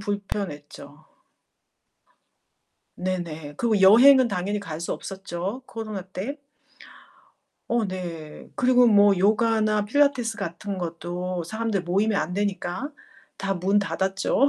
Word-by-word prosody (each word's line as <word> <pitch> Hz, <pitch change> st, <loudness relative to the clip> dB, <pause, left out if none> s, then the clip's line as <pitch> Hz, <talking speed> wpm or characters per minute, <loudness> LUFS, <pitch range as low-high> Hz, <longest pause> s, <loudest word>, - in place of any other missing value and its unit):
불편했죠. 200 Hz, -7 st, -6 dB, 1.9 s
네네. 170 Hz, -5 st, -4 dB
그리고 220 Hz, -1 st, +1 dB
여행은 250 Hz, +6 st, +7 dB
당연히 200 Hz, +1 st, -2 dB
갈 160 Hz, -6 st, -6 dB
수 170 Hz, -, -2 dB
없었죠 195 Hz, +4 st, -5 dB
코로나 215 Hz, -4 st, -6 dB
때. 195 Hz, +9 st, -6 dB, 1.3 s
어 235 Hz, -1 st, +1 dB
네. 170 Hz, -5 st, -7 dB
그리고 250 Hz, -1 st, +5 dB
뭐 205 Hz, -3 st, +5 dB
요가나 215 Hz, +1 st, +2 dB
필라테스 250 Hz, -1 st, +2 dB
같은 195 Hz, 0 st, -5 dB
것도 175 Hz, +1 st, -4 dB
사람들 220 Hz, 0 st, -2 dB
모이면 200 Hz, +4 st, +1 dB
안 180 Hz, -, -3 dB
되니까 200 Hz, +5 st, -2 dB, 0.5 s
다 195 Hz, -1 st, -1 dB
문 190 Hz, +3 st, +2 dB
닫았죠. 195 Hz, +6 st, +1 dB
200 Hz, 230 characters per minute, -25 LUFS, 180-220 Hz, 1.9 s, 여행은